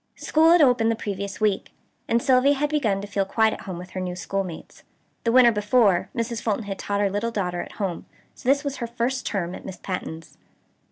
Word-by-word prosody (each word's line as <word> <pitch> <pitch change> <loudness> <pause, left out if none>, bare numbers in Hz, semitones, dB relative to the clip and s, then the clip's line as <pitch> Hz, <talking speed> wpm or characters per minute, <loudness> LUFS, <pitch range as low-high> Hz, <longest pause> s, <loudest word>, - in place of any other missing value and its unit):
School 320 +1 +3
had 345 -2 +6
opened 245 -4 +4
the 230 - +1
previous 200 -2 -5
week, 210 -3 0 0.3
and 235 +1 +1
Sylvia 270 +1 +4
had 295 +2 -1
begun 220 -10 +1
to 205 - -7
feel 200 -1 0
quite 220 +3 +2
at - - -8
home 185 -3 -6
with 180 +1 -9
her 185 - -5
new 180 -1 -3
schoolmates. 185 -2 -5 0.4
The 230 - +3
winter 245 -1 +7
before, 210 -3 +2
Mrs. 230 -1 -2
Fulton 220 0 -1
had 195 -1 -5
taught 200 0 -1
her 200 - +2
little 205 +4 -1
daughter 180 -6 -2
at - - -9
home; 190 -5 -4 0.3
so 250 - -4
this 280 +1 +3
was 280 -1 -3
her 235 - -3
first 240 +2 -2
term 180 -4 -2
at - - -8
Miss 190 -1 -7
Patten's. 165 -3 -6
210 Hz, 220 wpm, -24 LUFS, 195-245 Hz, 0.4 s, winter